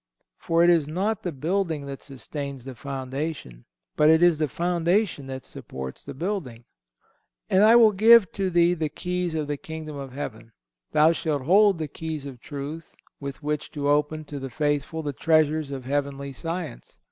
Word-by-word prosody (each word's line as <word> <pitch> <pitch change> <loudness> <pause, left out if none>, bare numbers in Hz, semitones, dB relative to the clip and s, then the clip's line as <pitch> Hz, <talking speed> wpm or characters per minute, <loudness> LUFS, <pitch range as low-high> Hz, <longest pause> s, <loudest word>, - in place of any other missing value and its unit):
For 165 0 +2
it 175 - +6
is 165 -4 +3
not 195 +7 -1
the 175 - -3
building 160 +1 -1
that 140 -1 -7
sustains 140 -1 -7
the 135 - -6
foundation, 135 - -5 0.3
but 150 0 +5
it 160 +2 +5
is 175 -3 +5
the 155 - +1
foundation 175 -1 0
that 130 -1 -6
supports 65 0 -8
the - - -8
building. 140 - -4 0.9
"And 190 +2 +5
I 220 +2 +7
will 230 -2 +7
give 215 -1 +6
to 195 -1 -1
thee 175 0 +4
the 160 -3 -2
keys 180 0 -3
of 155 -2 -1
the 145 0 -3
Kingdom 155 -1 -7
of 135 -2 -7
Heaven."(177) 115 -5 -6 0.4
Thou 155 +2 +6
shalt 155 -4 -1
hold 195 +5 +5
the 155 -1 -3
keys 155 -1 -5
of 135 -3 -8
truth 150 +3 -7 0.2
with 140 +1 -7
which 150 0 -2
to 145 -1 -1
open 150 +1 +1
to 145 -1 -6
the 135 0 -5
faithful 150 +2 -1
the 145 -1 -3
treasures 155 +1 +2
of 135 -2 -6
heavenly 140 0 -2
science. 165 - -6
155 Hz, 180 wpm, -25 LUFS, 140-170 Hz, 0.9 s, I